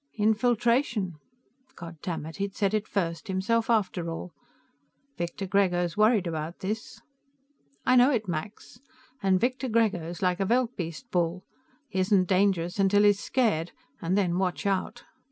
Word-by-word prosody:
"Infiltration." 225 - +1 0.6
Goddamit, 165 -1 -6
he'd 200 0 -3
said 200 -1 0
it 215 0 0
first, 165 -4 -2
himself 215 +5 0
after 190 -6 +1
all! 165 +1 -6 0.8
"Victor 170 +3 -4
Grego's 180 -3 +1
worried 215 -2 +4
about 160 0 -4
this." 215 +4 -5 0.8
"I 255 - +4
know 250 +2 +6
it, 225 -7 0
Max. 195 +7 -6 0.4
And 190 -2 +3
Victor 255 +3 -1
Grego's 190 -7 0
like 180 0 +1
a 195 - +1
veldbeest 235 -4 -1
bull; 175 +1 0 0.4
he 190 - -3
isn't 185 0 +3
dangerous 185 -1 +1
till 205 +1 +4
he's 205 -1 +4
scared, 205 -12 0 0.3
and 185 +2 0
then 180 -3 +1
watch 180 -5 -1
out. 200 +4 -1
195 Hz, 135 wpm, -27 LUFS, 175-220 Hz, 0.8 s, know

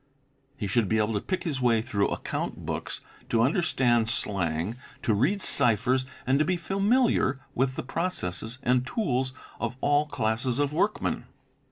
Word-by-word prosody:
He 105 - -3
should 100 +1 +1
be 110 - +2
able 110 +1 +1
to 105 - -1
pick 185 - -2
his 145 -7 -2
way 115 -3 +3
through 100 -3 +1
account - - -4
books, - - -4 0.3
to 115 0 +3
understand 125 -6 +2
slang, 95 -1 -1 0.3
to 110 - +2
read 165 - +1
ciphers, 125 +3 +3 0.2
and 135 +4 +3
be 180 +2 0
familiar 195 - +2 0.2
with 130 +1 0
the - - -3
processes 125 - -3
and 125 0 +3
tools 130 - 0 0.3
of 120 0 -2
all 145 +2 +2
classes 120 -1 0
of 145 0 +1
workmen. 200 +7 0
125 Hz, 155 wpm, -27 LUFS, 110-150 Hz, 0.3 s, way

